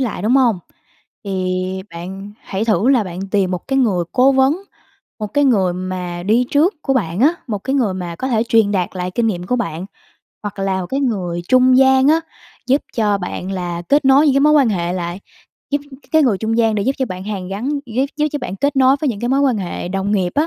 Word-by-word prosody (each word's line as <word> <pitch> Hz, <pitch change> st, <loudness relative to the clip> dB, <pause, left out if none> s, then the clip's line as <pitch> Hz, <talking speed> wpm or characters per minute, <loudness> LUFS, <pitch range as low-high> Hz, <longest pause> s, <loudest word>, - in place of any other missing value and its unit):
lại, 235 Hz, -8 st, -2 dB
đúng 235 Hz, +6 st, +3 dB
hông? 240 Hz, -7 st, +3 dB, 0.7 s
Thì 185 Hz, -1 st, -2 dB
bạn 190 Hz, +4 st, -8 dB
hãy 195 Hz, +2 st, -3 dB
thử 215 Hz, 0 st, +2 dB
là 255 Hz, -5 st, +4 dB
bạn 185 Hz, +1 st, -6 dB
tìm 195 Hz, -3 st, +1 dB
một 180 Hz, -1 st, -5 dB
cái 270 Hz, 0 st, +1 dB
người 200 Hz, -9 st, +1 dB
cố 260 Hz, +2 st, +4 dB
vấn, 270 Hz, +6 st, +2 dB, 0.6 s
một 210 Hz, -, -2 dB
cái 285 Hz, +8 st, +1 dB
người 200 Hz, -9 st, +3 dB
mà 180 Hz, -1 st, -5 dB
đi 225 Hz, +6 st, +2 dB
trước 320 Hz, +8 st, +3 dB
của 270 Hz, -, 0 dB
bạn 185 Hz, -6 st, -1 dB
á, 300 Hz, +7 st, +4 dB
một 210 Hz, -3 st, -2 dB
cái 265 Hz, +7 st, -3 dB
người 230 Hz, -9 st, +1 dB
mà 175 Hz, -2 st, -5 dB
có 260 Hz, -, -3 dB
thể 225 Hz, -4 st, +1 dB
truyền 225 Hz, -4 st, +3 dB
đạt 185 Hz, -3 st, 0 dB
lại 180 Hz, 0 st, -3 dB
kinh 230 Hz, +5 st, 0 dB
nghiệm 180 Hz, -5 st, -2 dB
của 250 Hz, -, 0 dB
bạn. 175 Hz, -6 st, -4 dB, 0.6 s
Hoặc 205 Hz, -1 st, -6 dB
là 195 Hz, -1 st, -1 dB
một 180 Hz, -, -4 dB
cái 270 Hz, +8 st, -2 dB
người 185 Hz, -10 st, -2 dB
trung 255 Hz, 0 st, +5 dB
gian 265 Hz, 0 st, +5 dB
á, 320 Hz, +2 st, +4 dB, 0.5 s
giúp 270 Hz, +3 st, +2 dB
cho 210 Hz, -3 st, +2 dB
bạn 185 Hz, 0 st, -5 dB
là 175 Hz, -2 st, -4 dB
kết 285 Hz, +1 st, +3 dB
nối 270 Hz, +3 st, +5 dB
những 280 Hz, -, +3 dB
cái 275 Hz, -, +3 dB
mối 300 Hz, +2 st, +5 dB
quan 285 Hz, -5 st, +4 dB
hệ 175 Hz, -4 st, -1 dB
lại, 175 Hz, 0 st, -4 dB, 0.5 s
giúp 285 Hz, -, +1 dB, 0.3 s
cái 315 Hz, -, +5 dB
người 230 Hz, -9 st, +2 dB
trung 225 Hz, +2 st, -1 dB
gian 225 Hz, -2 st, +3 dB
để 205 Hz, -, 0 dB
giúp 265 Hz, -, +1 dB
cho 260 Hz, -, 0 dB
bạn 185 Hz, -3 st, -7 dB
hàn 195 Hz, -3 st, -5 dB
gắn, 205 Hz, +8 st, -3 dB, 0.2 s
giúp 245 Hz, +3 st, 0 dB
giúp 300 Hz, 0 st, +1 dB
cho 295 Hz, -, -2 dB
bạn 220 Hz, -8 st, -5 dB
kết 285 Hz, +7 st, 0 dB
nối 265 Hz, +1 st, +5 dB
với 300 Hz, -, 0 dB
những 205 Hz, -4 st, -6 dB
cái 240 Hz, -, -2 dB
mối 270 Hz, +2 st, +2 dB
quan 260 Hz, -6 st, +2 dB
hệ 180 Hz, -2 st, -4 dB
đồng 195 Hz, +2 st, -2 dB
nghiệp 185 Hz, -3 st, 0 dB
á. 300 Hz, +2 st, +2 dB
215 Hz, 245 wpm, -18 LUFS, 185-265 Hz, 0.7 s, trung